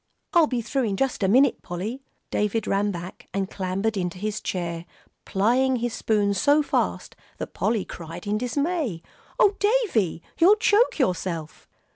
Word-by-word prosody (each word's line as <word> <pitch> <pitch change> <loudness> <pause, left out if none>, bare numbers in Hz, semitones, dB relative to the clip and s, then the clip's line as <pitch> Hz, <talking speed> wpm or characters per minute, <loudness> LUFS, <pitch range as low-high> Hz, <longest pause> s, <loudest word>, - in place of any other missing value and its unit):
"I'll 335 -3 +6
be 245 -4 -2
through 255 +3 0
in 200 -3 -1
just 270 -1 0
a 190 - +3
minute, 260 +6 +4
Polly." 200 +9 -5 0.3
David 210 +1 0
ran 200 +1 +1
back 180 -1 -7
and 195 -1 -1
clambered 195 +3 -1
into 180 -2 -2
his 210 +2 -3
chair, 170 -2 -4 0.4
plying 250 +7 +2
his 240 -1 -2
spoon 205 -2 +1
so 285 +10 +3
fast - - -1 0.2
that - - -6
Polly 220 -2 0
cried 170 +2 -8
in 210 +1 0
dismay, 265 - -1 0.3
"Oh, 400 -1 +4
Davie, 410 - +1 0.2
you'll 375 +5 +7
choke 430 +2 +3
yourself!" 180 - -2
215 Hz, 155 wpm, -25 LUFS, 185-265 Hz, 0.4 s, you'll